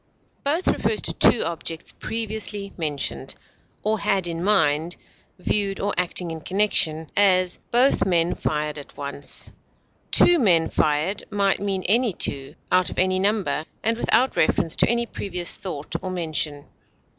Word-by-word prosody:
Both 315 Hz, +6 st, 0 dB
refers 440 Hz, -, +1 dB
to -, -, -1 dB
two 230 Hz, -, +4 dB
objects 165 Hz, -1 st, -5 dB
previously 215 Hz, -3 st, -4 dB
mentioned, 150 Hz, -5 st, -3 dB, 0.5 s
or 215 Hz, 0 st, 0 dB
had 195 Hz, -2 st, 0 dB
in 170 Hz, 0 st, -4 dB
mind, 165 Hz, -4 st, +2 dB, 0.4 s
viewed 195 Hz, +1 st, -1 dB
or 205 Hz, 0 st, -1 dB
acting 180 Hz, -1 st, -1 dB
in 160 Hz, -1 st, -6 dB
connection; 160 Hz, -5 st, +1 dB
as, 185 Hz, -3 st, +3 dB
both 250 Hz, +3 st, +3 dB
men 175 Hz, -2 st, +2 dB
fired 150 Hz, 0 st, -2 dB
at 145 Hz, -, -13 dB
once; 140 Hz, 0 st, -1 dB, 0.6 s
"two 350 Hz, -1 st, +5 dB
men 170 Hz, -, +3 dB
fired" 155 Hz, +7 st, 0 dB
might 200 Hz, -2 st, +1 dB
mean 195 Hz, -2 st, -2 dB
any 230 Hz, +1 st, +2 dB
two, 140 Hz, -2 st, -2 dB, 0.2 s
out 185 Hz, 0 st, +3 dB
of -, -, -9 dB
any 185 Hz, 0 st, +2 dB
number, 200 Hz, -5 st, 0 dB, 0.2 s
and 225 Hz, +1 st, +2 dB
without 240 Hz, +2 st, +1 dB
reference 160 Hz, +1 st, +2 dB
to -, -, +3 dB
any 235 Hz, 0 st, +1 dB
previous 180 Hz, -5 st, -1 dB
thought 150 Hz, -6 st, -7 dB
or 185 Hz, -, -5 dB
mention. 155 Hz, -5 st, -2 dB
185 Hz, 145 wpm, -23 LUFS, 160-210 Hz, 0.6 s, two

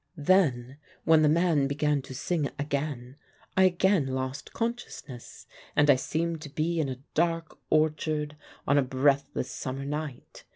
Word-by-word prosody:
Then 145 Hz, -6 st, +2 dB, 0.3 s
when 160 Hz, -1 st, +5 dB
the 150 Hz, -, +5 dB
man 160 Hz, -3 st, +3 dB
began 145 Hz, 0 st, +1 dB
to 130 Hz, 0 st, -10 dB
sing 150 Hz, +1 st, -1 dB
again, 140 Hz, -3 st, -3 dB, 0.4 s
I 190 Hz, -, +6 dB
again 185 Hz, -4 st, +3 dB
lost 130 Hz, +1 st, -4 dB
consciousness, 230 Hz, -, -5 dB, 0.3 s
and 145 Hz, 0 st, +6 dB
I -, -, +6 dB
seemed 165 Hz, +4 st, -2 dB
to 155 Hz, -, -7 dB
be 165 Hz, +3 st, -1 dB
in 145 Hz, -4 st, 0 dB
a 130 Hz, +1 st, -7 dB
dark 165 Hz, 0 st, 0 dB
orchard 155 Hz, -1 st, +1 dB, 0.3 s
on 145 Hz, 0 st, +4 dB
a -, -, +4 dB
breathless 135 Hz, 0 st, +1 dB
summer 135 Hz, 0 st, -5 dB
night. 150 Hz, -2 st, -6 dB
150 Hz, 150 wpm, -28 LUFS, 135-160 Hz, 0.4 s, I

